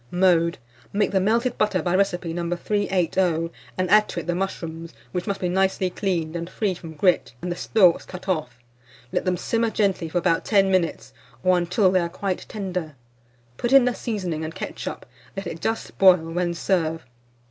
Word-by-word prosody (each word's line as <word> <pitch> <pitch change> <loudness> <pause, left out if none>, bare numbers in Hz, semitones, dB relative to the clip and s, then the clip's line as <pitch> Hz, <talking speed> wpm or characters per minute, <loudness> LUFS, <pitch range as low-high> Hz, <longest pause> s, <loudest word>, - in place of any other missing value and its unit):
Mode. 175 -2 +3 0.3
Make 205 +1 +1
the 195 - +3
melted 230 +5 +1
butter 200 -5 +1
by 175 +2 +1
recipe 180 -3 0
No. 170 0 -2
380, 180 -4 0 0.3
and 185 -1 0
add 210 0 +6
to - - -3
it - - -6
the 175 - 0
mushrooms, 165 -5 -4 0.2
which 180 +6 -3
must 200 -1 -2
be 180 - -1
nicely 190 0 +1
cleaned, 175 -5 -2
and 170 0 -4
free 200 0 -1
from 165 -2 -9
grit, 150 -8 +2
and 180 - -4
the - - -2
stalks 180 -1 +3
cut 180 +1 -10
off. 155 -10 -2 0.5
Let - - -1
them 180 -1 +1
simmer 230 +3 0
gently 195 -6 0
for 175 - -2
about 170 -1 +2
10 195 -3 +3
minutes, 180 -3 0 0.3
or 185 0 +4
until 180 +2 +2
they 185 - +3
are 170 -1 -1
quite 185 +1 -3
tender. 180 -7 -4 0.6
Put 240 - -1
in 270 -2 +7
the 250 - +1
seasoning 185 -10 -3
and 160 +1 -5
ketchup; - - -6 0.3
let 195 - -4
it 165 - -6
just 225 0 -2
boil, 185 -2 +8
when 175 0 -1
serve. 165 -3 0
180 Hz, 190 wpm, -24 LUFS, 170-195 Hz, 0.6 s, boil